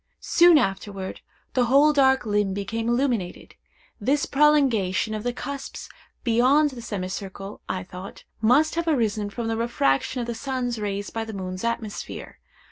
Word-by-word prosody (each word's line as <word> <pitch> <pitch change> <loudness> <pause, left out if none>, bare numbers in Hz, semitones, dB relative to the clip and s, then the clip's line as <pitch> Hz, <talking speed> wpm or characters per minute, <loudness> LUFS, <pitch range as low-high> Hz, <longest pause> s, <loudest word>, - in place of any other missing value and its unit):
Soon 345 -1 +6
afterward, 195 -4 -2 0.3
the 250 -2 +3
whole 280 +5 +5
dark 265 -2 +4
limb 205 -2 0
became 225 +3 -2
illuminated. 240 -7 -1 0.5
This 275 +7 +1
prolongation 260 -9 +2
of 215 - -3
the 245 +2 -1
cusps 275 +3 -7 0.3
beyond 260 +6 +4
the 250 -2 -8
semicircle, 195 -1 -6
I 185 0 -2
thought, 185 +1 -10 0.2
must 265 +8 +4
have 335 0 -2
arisen 220 -8 +1
from 225 +3 -4
the 225 0 -1
refraction 230 - 0
of 240 - -2
the 235 - -3
sun's 245 -1 -3
rays 205 -1 -3
by 225 - -3
the 220 0 -7
moon's 185 -1 -5
atmosphere. 230 -2 -4
230 Hz, 150 wpm, -24 LUFS, 200-265 Hz, 0.5 s, Soon